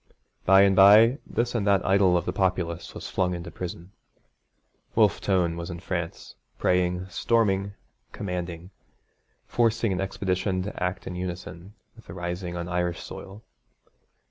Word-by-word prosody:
By 95 +1 +7
and 100 -1 +4
by 110 +7 +7
this 120 +1 -1
and 110 -4 -1
that 100 -2 +3
idol 95 -2 +4
of 85 - -2
the 90 - -2
populace 90 -3 -1
was - - -6
flung 90 -1 0
into 85 0 -7
prison. 90 0 -7 1.0
Wolfe - - +3
Tone 90 -4 +1
was 85 0 -6
in 85 -1 -6
France, 85 -2 -5 0.2
praying, 90 0 +1
storming, 100 -1 +1 0.4
commanding, 90 -2 -5 0.7
forcing 115 -2 +1
an 90 - -2
expedition 95 -1 -1
to 100 -2 -5
act 90 0 -3
in - - -5
unison 90 +2 -7 0.2
with - - -18
a - - -8
rising 85 0 -4
on 85 0 -4
Irish 90 -1 -1
soil. 100 +3 -10
90 Hz, 145 wpm, -26 LUFS, 90-100 Hz, 1.0 s, By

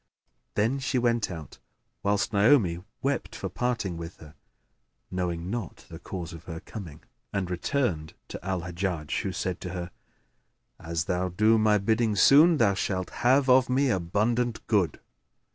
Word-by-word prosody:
Then 115 +6 +1
she 135 0 -1
went 120 -2 +1
out 80 -6 -8 0.4
(whilst 100 +1 0
Naomi 100 -5 +4 0.2
wept 140 +1 -1
for 95 - -4
parting 110 -4 -2
with 85 +1 -7
her 75 -1 -14 0.8
knowing 90 -1 -2
not 120 0 -5
the 80 - -8
cause 85 -1 -6
of 85 -1 -11
her 80 -2 -6
coming), 85 -6 -9 0.3
and 95 -3 -2
returned 90 - -1
to - - -7
Al 95 -2 -2
Hajjaj 85 -3 -2
who 95 - -3
said 90 -1 -3
to 90 - -5
her, 90 -1 -5 0.9
"As 80 0 -3
thou 90 +1 -1
do 110 +5 +3
my 105 -1 +4
bidding 110 +2 +1
soon, 155 - +7
thou 105 -6 +4
shalt 95 -1 -2
have 130 +3 +4
of 130 0 +5
me 130 +1 +2
abundant 110 +6 0
good." 100 -6 +1
100 Hz, 155 wpm, -27 LUFS, 85-120 Hz, 0.9 s, soon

